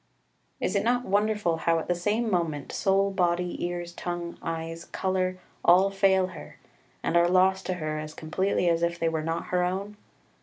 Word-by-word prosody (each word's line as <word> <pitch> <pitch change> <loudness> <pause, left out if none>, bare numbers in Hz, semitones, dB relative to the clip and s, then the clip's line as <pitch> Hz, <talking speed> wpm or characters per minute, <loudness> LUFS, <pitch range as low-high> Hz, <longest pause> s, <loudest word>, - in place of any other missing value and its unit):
3 - - -3
Is 185 - -1
it 200 - +2
not 245 +2 +1
wonderful 205 -4 +1
how 165 0 +2
at 165 - -3
the 180 - +2
same 210 +7 0
moment 160 -6 -1
soul, 195 0 +2
body, 180 -1 0
ears, 175 0 -3
tongue, 175 -1 -4
eyes, 165 0 -4
colour, 185 -1 -1 0.3
all 185 +3 +5
fail 195 -1 +3
her, 155 - -11 0.5
and - - 0
are 170 0 +5
lost 190 +1 +3
to 185 - -1
her 155 -2 -3
as 155 0 -7
completely 180 +3 0
as 165 -1 +2
if 170 0 0
they 165 -1 +1
were 160 -1 -1
not 165 +1 -3
her 180 0 +2
own? 195 +3 -3
180 Hz, 190 wpm, -27 LUFS, 165-190 Hz, 0.5 s, all